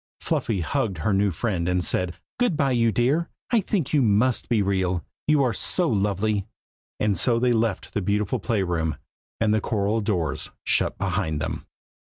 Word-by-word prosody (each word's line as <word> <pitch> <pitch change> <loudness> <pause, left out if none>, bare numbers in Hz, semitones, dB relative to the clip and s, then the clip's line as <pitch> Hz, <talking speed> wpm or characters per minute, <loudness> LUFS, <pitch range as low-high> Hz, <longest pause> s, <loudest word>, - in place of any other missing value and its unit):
Fluffy 100 -5 -1
hugged 110 - -1
her 80 +7 0
new 100 +1 +3
friend 90 -1 -1
and 90 0 +1
said 90 -1 0 0.2
"good 245 -11 +2
bye, 140 -3 +2
you 115 -2 +3
dear! 135 - +1 0.2
I 235 -3 +4
think 180 - -2
you 145 - +4
must 115 +2 +2
be 110 -4 +3
real, 95 -3 0 0.2
you 150 -2 +4
are 125 -3 +1
so 180 - +1
lovely!" 105 -1 0 0.5
and 105 -2 +2
so 115 +7 +2
they 125 +1 +2
left 115 -3 -1
the 105 - 0
beautiful 105 +5 0
play 105 -1 0
room, 80 -3 -1 0.4
and 110 -1 +2
the 110 - +2
coral 105 +1 0
doors 90 -8 -1 0.2
shut - - +1
behind 95 -5 -1
them. 80 - -4
105 Hz, 180 wpm, -24 LUFS, 95-120 Hz, 0.5 s, I